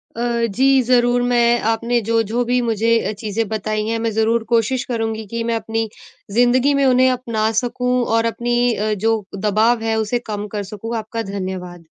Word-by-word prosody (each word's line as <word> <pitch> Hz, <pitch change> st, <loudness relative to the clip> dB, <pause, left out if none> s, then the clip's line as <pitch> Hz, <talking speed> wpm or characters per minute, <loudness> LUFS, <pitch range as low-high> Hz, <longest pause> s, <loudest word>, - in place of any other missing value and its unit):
अ, 235 Hz, 0 st, 0 dB
जी, 270 Hz, +1 st, +4 dB
ज़रूर 245 Hz, -1 st, +3 dB
मैं 240 Hz, -1 st, +3 dB
आपने 230 Hz, +2 st, +1 dB
जो-जो 230 Hz, +1 st, +1 dB
भी 245 Hz, +1 st, +1 dB
मुझे 230 Hz, -1 st, 0 dB, 0.2 s
अ -, -, -1 dB
चीज़ें 220 Hz, 0 st, -2 dB
बताई 215 Hz, 0 st, -2 dB
हैं, 230 Hz, 0 st, -1 dB
मैं 225 Hz, 0 st, -1 dB
ज़रूर 225 Hz, +1 st, +2 dB
कोशिश 235 Hz, +2 st, +2 dB
करुँगी 225 Hz, -1 st, -2 dB
कि 230 Hz, 0 st, -2 dB
मैं 230 Hz, 0 st, -1 dB
अपनी 225 Hz, 0 st, -2 dB, 0.4 s
ज़िंदगी 245 Hz, +5 st, +3 dB
में 275 Hz, -, +3 dB
उन्हें 255 Hz, 0 st, +4 dB
अपना 230 Hz, -3 st, -1 dB
सकूँ 250 Hz, 0 st, -2 dB, 0.2 s
और 230 Hz, -, +1 dB
अपनी 240 Hz, +1 st, +1 dB
अ, 215 Hz, +1 st, -1 dB
जो 220 Hz, +1 st, 0 dB
दबाव 215 Hz, +4 st, +2 dB
है 220 Hz, -, +1 dB
उसे 240 Hz, +3 st, -1 dB
कम 210 Hz, 0 st, -3 dB
कर 205 Hz, -1 st, -2 dB
सकूँ। 225 Hz, +3 st, -5 dB
आपका 225 Hz, +1 st, -4 dB
धन्यवाद। 180 Hz, -3 st, -6 dB
230 Hz, 180 wpm, -19 LUFS, 215-240 Hz, 0.4 s, जी